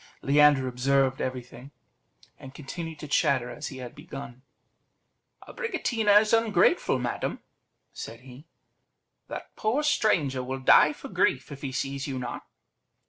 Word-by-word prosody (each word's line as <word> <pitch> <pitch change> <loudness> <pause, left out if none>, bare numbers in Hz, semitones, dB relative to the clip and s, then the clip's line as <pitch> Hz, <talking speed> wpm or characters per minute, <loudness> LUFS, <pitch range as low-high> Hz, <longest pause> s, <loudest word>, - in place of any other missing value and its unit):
Leander 145 -1 +5
observed 130 +1 +1
everything, 125 +1 -6 0.7
and 135 +1 -12
continued 160 +2 -7
to 150 - -8
chatter 130 -3 +1
as 150 0 -6
he 135 - -8
had 125 -2 -8
begun 140 -5 -9 1.1
"Abricotina 225 - +2
is 215 0 -1
ungrateful, 225 - +3
madam," 125 -1 -3 0.5
said 115 +1 -8
he; 130 +4 -14 0.8
"that - - -8
poor 240 +8 0
stranger 155 - +1
will 130 +1 -4
die 130 - +6
for - - -10
grief - - 0
if 140 - -9
he 135 - -4
sees 135 +1 -3
you 135 -2 -4
not." 125 -1 -5
140 Hz, 135 wpm, -27 LUFS, 130-165 Hz, 1.1 s, die